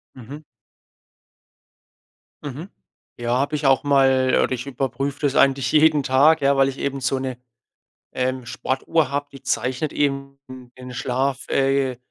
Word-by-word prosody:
Mhm. 135 +4 -10 2.0
Mhm. 145 +7 -7 0.5
Ja, 120 +1 0
habe 145 +3 -1
ich 150 - -3
auch 135 +1 +3
mal 135 -2 +3
oder - - 0
ich 125 0 -5
überprüfe 135 +1 -3
das 145 -1 0
eigentlich 135 -2 +3
jeden 155 -1 +4
Tag, 140 +4 +4
ja, 140 0 +2
weil 135 0 +4
ich 135 - -8
eben 140 -1 -2
so 135 0 0
'ne, 130 -2 -4 0.8
ähm, 130 -1 -2
Sportuhr 130 +4 -1
habe, 145 0 -2
die 135 -1 -13
zeichnet 130 +2 -2
eben 140 -1 -2 0.4
den 125 0 -9
Schlaf, 130 +2 -2
äh, 135 -2 +1
135 Hz, 145 wpm, -22 LUFS, 130-140 Hz, 2.0 s, jeden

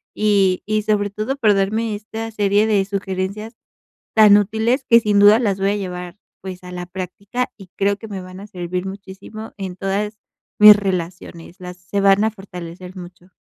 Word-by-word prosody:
y 200 -3 +2
y 215 0 0
sobre 205 -1 0
todo 215 +6 -3
por 220 -6 +3
darme 215 +3 0
esta 220 +2 -6
serie 205 0 +2
de 205 -3 +2
sugerencias 200 +3 -4 0.6
tan 210 -2 +7
útiles 220 +6 0
que 235 - +8
sin 210 -2 +2
duda 205 +2 +7
las 200 -5 -1
voy 195 +1 +1
a - - -1
llevar 180 -2 -6 0.2
pues 185 -1 -8
a 180 - -9
la 180 0 -6
práctica 200 +7 -5
y 195 -3 -13
creo 200 0 +1
que 220 - -10
me 195 -3 -6
van 185 +1 -11
a 205 - -10
servir 180 -2 -5
muchísimo 195 +3 -9
en 190 -3 -6
todas 205 +2 -2 0.4
mis 210 0 +10
relaciones, 180 -2 -5
las 180 0 -9
se 180 +3 -4
van 195 +1 +4
a 220 - 0
fortalecer 180 -2 -10
mucho. 180 0 -12
200 Hz, 185 wpm, -20 LUFS, 185-215 Hz, 0.6 s, mis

